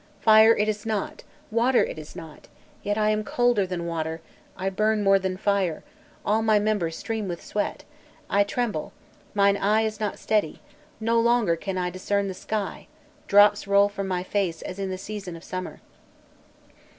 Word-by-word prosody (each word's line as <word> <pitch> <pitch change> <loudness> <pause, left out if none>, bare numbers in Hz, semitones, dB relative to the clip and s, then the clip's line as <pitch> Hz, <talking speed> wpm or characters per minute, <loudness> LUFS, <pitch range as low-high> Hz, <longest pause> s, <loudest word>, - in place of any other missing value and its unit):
Fire 220 +1 +7
it 210 - +1
is 210 -1 -2
not, 215 -3 -3 0.3
water 240 +3 +3
it - - -5
is 155 +2 -11
not, 160 -4 -11 0.3
yet 205 +1 -1
am 215 0 +2
I - - -4
colder 240 -3 +1
than 180 -2 -4
water, 160 -1 -3 0.4
I 190 +1 -2
burn 215 +2 +1
more 195 0 +5
than 190 -1 -3
fire, 195 -5 0 0.4
all 215 +2 +2
my 220 -1 +3
members 205 -6 0
stream 220 -3 -3
with 175 -2 -6
sweat, 210 - -3 0.4
I 200 0 +3
tremble, 210 -6 -3 0.4
mine 200 0 +4
eye 210 +3 +2
is 215 -1 -3
not 210 -1 -2
steady, 210 -8 0 0.4
no 230 +1 +2
longer 235 -6 +3
can 190 +3 -4
I 180 -1 -1
discern 200 +2 -1
the 190 - -4
sky, 205 +2 -4 0.4
drops 205 0 +5
roll 200 0 +4
from 200 -1 -5
my 180 -1 -1
face 185 -4 -2
as 185 - -7
in 195 -1 -2
the 185 - -3
season 195 -2 -7
of 165 - -11
summer." 185 0 -6
200 Hz, 175 wpm, -25 LUFS, 185-215 Hz, 0.4 s, Fire